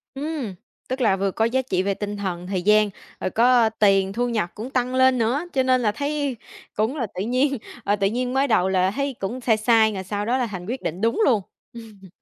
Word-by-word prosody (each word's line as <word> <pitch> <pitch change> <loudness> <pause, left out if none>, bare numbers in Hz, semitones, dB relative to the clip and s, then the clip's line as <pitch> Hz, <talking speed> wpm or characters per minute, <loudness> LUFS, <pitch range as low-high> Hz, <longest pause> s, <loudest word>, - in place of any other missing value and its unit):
Ừm, 280 -8 -4 0.3
tức 260 +1 -3
là 215 -6 +3
vừa 195 0 0
có 220 - 0
giá 260 +3 +1
trị 185 -7 -1
về 200 +1 0
tinh 205 +1 -5
thần, 180 -3 -4
thời 185 -1 -2
gian, 210 +1 +4 0.3
rồi - - -2
có, 230 - +2 0.2
ơ, 225 - +4
tiền 195 -2 +3
thu 245 +3 -1
nhập 215 -7 -1
cũng 235 +5 -7
tăng 255 0 -1
lên 260 0 +4
nữa, 240 +7 0
cho 265 - +2
nên 255 0 +2
là 210 -2 +2
thấy 285 0 -2 0.4
cũng 220 +7 0
là 240 -6 -1
tự 185 - -3
nhiên, 255 +5 +1 0.3
à, 205 - +2
tự 195 -1 +1
nhiên 250 +4 -1
mới 270 +1 +3
đầu 205 -7 +2
là 185 0 +2
thấy 275 +4 -2
cũng 235 +7 -3
sai 230 -3 +2
sai 220 0 +3
rồi 190 - -4
sau 205 +2 -3
đó 245 +4 +1
là 250 - 0
thành 185 -5 -7
quyết 250 +5 -4
định 170 +4 -4
đúng 230 - +1
luôn. 220 -7 +3 0.3
Ưm. 215 -5 -12
225 Hz, 245 wpm, -23 LUFS, 200-255 Hz, 0.4 s, gian